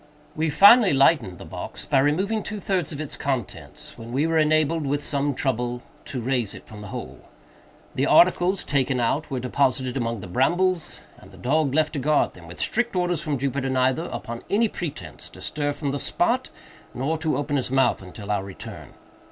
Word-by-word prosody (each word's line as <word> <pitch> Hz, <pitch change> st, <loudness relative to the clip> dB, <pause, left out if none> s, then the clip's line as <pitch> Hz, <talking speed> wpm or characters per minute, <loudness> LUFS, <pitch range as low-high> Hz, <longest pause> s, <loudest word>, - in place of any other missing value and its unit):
We, 160 Hz, +1 st, 0 dB
finally, 200 Hz, -, +7 dB
lightened 135 Hz, -, +3 dB
the -, -, -10 dB
box -, -, -7 dB
by 135 Hz, -, +3 dB
removing 190 Hz, +11 st, +1 dB
two 210 Hz, +1 st, -5 dB
thirds 190 Hz, -6 st, -1 dB
of 145 Hz, -, -6 dB
its 155 Hz, -2 st, -4 dB
contents, 135 Hz, -4 st, -5 dB
when 115 Hz, +1 st, -8 dB
we 140 Hz, +5 st, +1 dB
were 165 Hz, 0 st, +2 dB
enabled, 155 Hz, +1 st, +2 dB
with 145 Hz, +1 st, -1 dB
some 140 Hz, -1 st, -1 dB
trouble, 125 Hz, -2 st, -2 dB, 0.2 s
to 130 Hz, -, -4 dB
raise 120 Hz, -3 st, -1 dB
it -, -, -12 dB
from 105 Hz, -1 st, -11 dB
the 105 Hz, -, -8 dB
hole. -, -, -7 dB, 0.7 s
The 135 Hz, +3 st, 0 dB
articles 180 Hz, +2 st, +4 dB
taken 135 Hz, -2 st, 0 dB
out 140 Hz, +6 st, 0 dB
were 135 Hz, -3 st, -2 dB
deposited 130 Hz, 0 st, +1 dB
among 115 Hz, -4 st, -2 dB
the -, -, -7 dB
brambles, 170 Hz, -, 0 dB, 0.2 s
and -, -, -15 dB
the -, -, -15 dB
dog 140 Hz, +1 st, +1 dB
left 155 Hz, 0 st, +2 dB
to 145 Hz, -, -2 dB
guard 150 Hz, +3 st, +2 dB
them, 85 Hz, -2 st, -14 dB
with 90 Hz, -, -10 dB
strict 240 Hz, -2 st, 0 dB
orders 175 Hz, -2 st, 0 dB
from 150 Hz, -3 st, -2 dB
Jupiter 135 Hz, +1 st, -1 dB
neither, 130 Hz, +5 st, +1 dB
upon 120 Hz, -8 st, -6 dB
any 220 Hz, +3 st, +3 dB
pretence, 175 Hz, -7 st, -7 dB
to -, -, -14 dB
stir 145 Hz, -1 st, -2 dB
from 145 Hz, -1 st, -3 dB
the 140 Hz, -, -3 dB
spot, -, -, 0 dB, 0.5 s
nor 135 Hz, +6 st, -1 dB
to 160 Hz, -1 st, 0 dB
open 145 Hz, 0 st, -2 dB
his 130 Hz, -3 st, 0 dB
mouth 130 Hz, -4 st, +2 dB
until 95 Hz, +3 st, -7 dB
our 100 Hz, -2 st, 0 dB
return. 95 Hz, -1 st, -10 dB
140 Hz, 195 wpm, -24 LUFS, 125-160 Hz, 0.7 s, finally